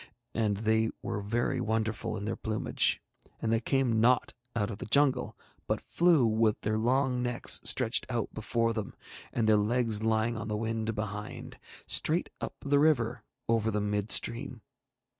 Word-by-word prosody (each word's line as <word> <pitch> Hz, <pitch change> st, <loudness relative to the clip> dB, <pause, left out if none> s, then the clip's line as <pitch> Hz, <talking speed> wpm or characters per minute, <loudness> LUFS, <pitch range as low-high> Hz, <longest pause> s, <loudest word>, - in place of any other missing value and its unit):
And 105 Hz, -3 st, 0 dB
they 110 Hz, +1 st, +1 dB
were 100 Hz, -, -3 dB
very 115 Hz, +4 st, -1 dB
wonderful 110 Hz, 0 st, -2 dB
in 100 Hz, -, -5 dB
their 110 Hz, -, -2 dB
plumage, 110 Hz, -1 st, 0 dB, 0.4 s
and 115 Hz, 0 st, 0 dB
they 115 Hz, -, +3 dB
came 120 Hz, -2 st, +1 dB
not 125 Hz, +2 st, +3 dB, 0.2 s
out 105 Hz, -1 st, 0 dB
of 100 Hz, -, -7 dB
the -, -, -6 dB
jungle, 135 Hz, +1 st, +2 dB, 0.3 s
but -, -, 0 dB
flew, 170 Hz, -7 st, +3 dB
with 110 Hz, -1 st, +2 dB
their 110 Hz, +1 st, 0 dB
long 125 Hz, +2 st, +1 dB
necks 120 Hz, -1 st, +1 dB
stretched 125 Hz, -2 st, +2 dB
out 120 Hz, -4 st, -2 dB
before 115 Hz, +1 st, 0 dB
them, 110 Hz, -3 st, -5 dB, 0.4 s
and 115 Hz, -2 st, 0 dB
their 110 Hz, -1 st, +5 dB
legs 110 Hz, 0 st, +1 dB
lying 110 Hz, +1 st, +1 dB
on 105 Hz, 0 st, -5 dB
the 105 Hz, -1 st, -2 dB
wind 115 Hz, 0 st, -2 dB
behind, 105 Hz, 0 st, -6 dB, 0.3 s
straight -, -, +2 dB
up -, -, -4 dB
the 140 Hz, 0 st, +2 dB
river 130 Hz, -6 st, +2 dB, 0.3 s
over 115 Hz, -1 st, +1 dB
the 105 Hz, -1 st, 0 dB
mid 105 Hz, 0 st, -1 dB
stream. 120 Hz, -2 st, 0 dB
115 Hz, 165 wpm, -30 LUFS, 110-120 Hz, 0.4 s, their